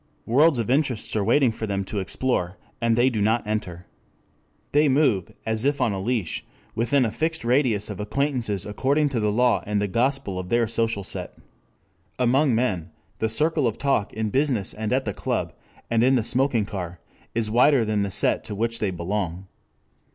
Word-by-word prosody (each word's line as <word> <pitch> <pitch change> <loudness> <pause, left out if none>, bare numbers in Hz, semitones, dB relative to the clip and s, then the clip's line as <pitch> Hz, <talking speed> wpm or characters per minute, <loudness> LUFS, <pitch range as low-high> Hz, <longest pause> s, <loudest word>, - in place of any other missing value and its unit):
Worlds 145 +5 +4
of 115 0 -1
interest 135 -7 0
are 105 - +1
waiting 120 +4 +3
for 110 0 -5
them 100 -1 -1
to 100 +2 -4
explore, 95 -2 -1 0.2
and 115 -1 +2
they 120 +2 +4
do 115 -5 0
not 110 +3 +1
enter. 90 -5 -4 0.9
They 150 0 +4
move, 130 - +2
as 110 0 0
if 140 +1 +1
on 125 -4 +2
a 95 - -3
leash, 110 -5 -2 0.3
within 125 +3 +2
a 110 - -1
fixed 160 -1 -2
radius 120 -5 +2
of 105 -2 -7
acquaintances 115 -3 -1
according 140 +8 +1
to 130 -4 -1
the 105 -1 +1
law 120 +2 +2
and 105 0 0
the 100 - 0
gospel 115 -3 0
of 90 0 -6
their 120 +2 +3
social 115 -2 0
set. - - -6 0.8
Among 130 +1 +3
men 105 -9 -1 0.3
the 110 - 0
circle 150 +4 +1
of 110 - -2
talk 135 -7 0
in 110 -1 -3
business 130 -7 0
and 110 0 -4
at 130 +1 +1
the 105 - -2
club - - -2 0.3
and 115 -1 +1
in 130 +2 +4
the 120 - +1
smoking 125 -2 +1
car 90 -4 -6 0.4
is 110 -2 0
wider 125 +1 +4
than 105 -1 0
the 100 - -1
set - - +1
to 105 - -5
which 115 +2 -1
they 105 - 0
belong. 90 0 -3
115 Hz, 190 wpm, -24 LUFS, 105-130 Hz, 0.9 s, Worlds